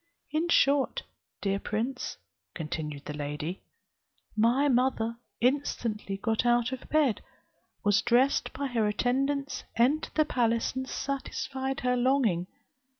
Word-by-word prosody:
In 320 +3 0
short, 285 - +3 0.4
dear 195 0 0
prince," 235 +6 -3 0.4
continued 150 -3 -4
the 150 - -5
lady, 150 +4 -4 0.7
"my 240 +6 +3
mother 245 -3 +1 0.2
instantly 230 -6 0
got 220 +3 0
out 240 0 +3
of 260 -1 -7
bed, 295 -8 +2 0.6
was 205 -1 +4
dressed 245 +3 +3
by 280 +2 -4
her 235 -5 +1
attendants, 275 +6 0
entered 265 +7 +2
the 310 - +4
palace, 230 -5 +1
and 260 0 -3
satisfied 270 0 -3
her 250 0 +2
longing. 245 -9 +2
245 Hz, 120 wpm, -29 LUFS, 210-270 Hz, 0.7 s, was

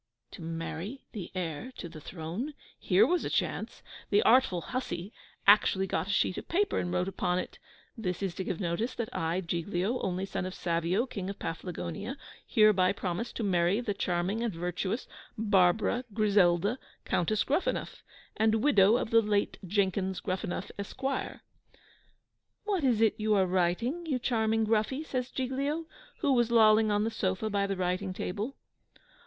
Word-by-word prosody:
To - - -10
marry 165 +8 -5
the 200 -7 -6
heir 175 - -4
to 175 - -6
the 160 -2 -11
throne! 180 - -5 0.2
Here 195 +3 +4
was 350 +6 +1
a - - -2
chance! - - -2 0.3
The 420 - +4
artful 240 -9 +4
hussy 200 -4 -4 0.3
actually 200 -1 +5
got 190 - -1
a - - -7
sheet 200 -2 +1
of - - -11
paper 400 +4 +1
and 175 - -2
wrote 180 +1 0
upon 180 -2 0
it, 185 - -5 0.4
"This 195 -5 -3
is 190 -3 -1
to 190 - -4
give 185 -2 -3
notice 195 +7 -1
that 230 -2 -4
I, 165 +3 0
Giglio, 180 +6 -1
only 185 0 -1
son 190 -1 -3
of 185 - -7
Savio, 170 +6 0
King 195 -7 -5
of 200 - -5
Paflagonia, 180 - -5 0.3
hereby 210 -5 +4
promise 190 +5 -3
to 230 - -3
marry 180 +1 +2
the 235 -4 -2
charming 185 +3 -1
and 235 -2 0
virtuous 180 +5 -3 0.3
Barbara 210 +3 +3
Griselda 205 +1 +3 0.3
Countess 210 +5 +1
Gruffanuff, 295 +7 -1 0.3
and 220 0 +2
widow 215 -6 +5
of 230 - -3
the 230 0 +6
late 205 -1 0
Jenkins 190 0 0
Gruffanuff, 185 0 -3
Esq." 200 +6 -7
"What 330 +7 -6
is 240 -5 +3
it 225 - +5
you 215 0 +2
are 190 -2 +4
writing, 190 - 0
you 275 -5 +1
dear 230 -3 0 0.2
Gruffy?" 225 +7 0
says 255 -3 -2
Giglio, 275 +5 -2 0.4
who 285 -4 +3
was 240 -2 +3
lolling 220 -1 +5
on 205 0 +2
the 225 - -1
sofa 190 +1 -1
by 200 -1 +1
the 195 - -1
writing 185 +1 -1
table. 210 +8 -4
200 Hz, 165 wpm, -30 LUFS, 180-235 Hz, 0.4 s, the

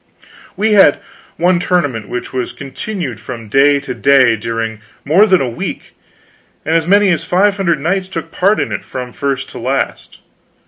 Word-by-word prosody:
We 215 +1 +1
had 195 -8 +6 0.4
one 175 +1 +2
tournament 145 - -1
which 125 +2 -5
was 130 -1 -3
continued 140 - -6
from 115 -2 -8
day 140 +4 +4
to 135 -3 -5
day 130 -1 +4
during 115 0 -4 0.2
more 185 +9 +5
than 185 -3 +3
a 135 - 0
week, 115 - -6 0.7
and 160 - +1
as 165 -1 +1
many 200 +1 +4
as 165 - 0
five 200 +3 +2
hundred 170 -6 +1
knights 185 +5 -1
took 165 -3 -6
part 200 +5 +2
in - - -2
it, - - -4
from 125 -1 -7
first 140 -2 -3
to - - -8
last. - - -3
145 Hz, 175 wpm, -15 LUFS, 125-185 Hz, 0.7 s, had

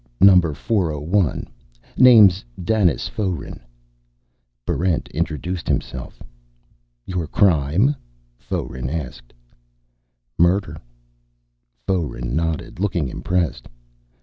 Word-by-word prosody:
Number 90 -5 +6
401. 85 - 0 0.5
Name's 110 -7 +7 0.2
Danis 95 -1 +1
Foeren." 95 -8 -4 1.1
Barrent 90 -2 0
introduced 85 +4 -3
himself. 65 -1 -4 0.8
"Your 90 -4 -3
crime?" 90 - +2 0.4
Foeren 65 0 -4
asked. 70 -6 -6 1.1
"Murder." 85 -2 +2 1.0
Foeren 75 -9 -2
nodded, 80 0 -2
looking 90 -8 -1
impressed. 90 +1 -2
85 Hz, 70 wpm, -21 LUFS, 75-95 Hz, 1.1 s, Name's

